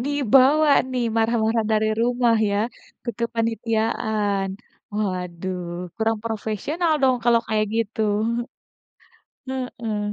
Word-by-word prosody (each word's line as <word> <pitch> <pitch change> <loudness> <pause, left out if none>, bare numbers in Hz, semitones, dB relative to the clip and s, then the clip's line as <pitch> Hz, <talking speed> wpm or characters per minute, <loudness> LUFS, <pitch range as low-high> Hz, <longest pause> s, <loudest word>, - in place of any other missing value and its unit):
Dibawa 285 +2 +4 0.2
nih 250 -1 0
marah-marah 225 0 +2
dari 215 0 +2 0.2
rumah 240 -1 +3
ya 200 - 0 0.5
ke 235 - -1
kepanitiaan. 220 -3 0 0.4
Waduh 185 -3 -3 0.3
kurang 225 0 0
profesional 230 - -1
dong 260 -1 +4
kalau 235 -1 +5
kayak 215 -1 +1
gitu. 225 0 -1 1.5
Heeh. 235 -5 -3
225 Hz, 95 wpm, -23 LUFS, 215-245 Hz, 1.5 s, kalau